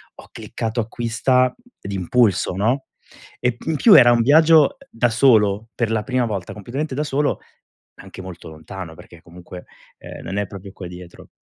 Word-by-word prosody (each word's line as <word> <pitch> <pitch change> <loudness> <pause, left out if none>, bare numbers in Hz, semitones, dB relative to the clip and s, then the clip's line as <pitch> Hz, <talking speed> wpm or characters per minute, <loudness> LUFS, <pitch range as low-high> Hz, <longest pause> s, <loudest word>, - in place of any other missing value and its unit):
ho - - -15
cliccato 115 +1 -5
acquista 120 +3 0 0.3
d'impulso, 100 0 0
no, 120 +7 0 0.5
e 125 -1 -1
in 160 - -1
più 215 +4 +7
era 120 -1 +8
un 120 - +2
viaggio, 160 +5 +6
uhm, 140 - +2 0.2
da 120 +1 +1
solo, 110 -3 +3
per 115 -2 -1
la 110 -1 0
prima 130 -2 0
volta, 100 -2 -5
completamente 130 +7 -5
da 150 - -1
solo, 145 0 -1 0.6
anche - - -12
molto 90 -2 -10
lontano 80 +2 -9
perché 85 +1 -15
comunque, 90 +1 -12 0.3
ehm, - - -11
non 95 - -5
è 105 - 0
proprio 100 0 -10
qua 95 -3 -9
dietro. 90 0 -12
115 Hz, 170 wpm, -20 LUFS, 95-125 Hz, 0.6 s, era